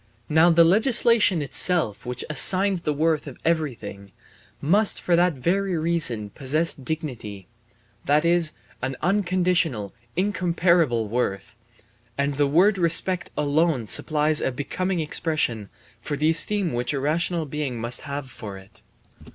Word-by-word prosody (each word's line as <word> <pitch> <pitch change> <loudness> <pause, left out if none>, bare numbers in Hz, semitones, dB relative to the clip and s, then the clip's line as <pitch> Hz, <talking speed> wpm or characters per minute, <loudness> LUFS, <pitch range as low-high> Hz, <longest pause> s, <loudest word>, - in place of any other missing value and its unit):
Now 160 +3 +4
the 170 0 +5
legislation 215 - +3
itself 145 - +1
which 125 0 -4
assigns 185 +5 +3
the 150 - -2
worth 155 +1 0
of 135 - -9
everything 115 - -3 0.5
must 200 +8 +1
for 175 - +1
that 175 0 +2
very 180 +7 -1
reason 155 -11 0
possess 155 +7 0
dignity, 130 - -7 0.6
that 150 +3 +2
is 170 -2 +2 0.3
an 130 +1 -3
unconditional 180 - 0 0.2
incomparable 170 - +1
worth; 105 -3 -3 0.6
and 140 +1 -1
the 145 +1 +1
word 185 +7 +3
respect 175 +1 +2
alone 150 -3 0
supplies 150 - +1
a - - -1
becoming 180 +7 -3
expression 150 - -2 0.3
for 145 +4 -4
the 155 +2 +2
esteem 175 +1 +1
which 120 +3 -1
a 140 - -2
rational 165 +3 -1
being 145 -4 -4
must 120 +2 -1
have 140 -2 -6
for 110 -6 -9
it. 95 +3 -16
155 Hz, 135 wpm, -23 LUFS, 130-175 Hz, 0.6 s, the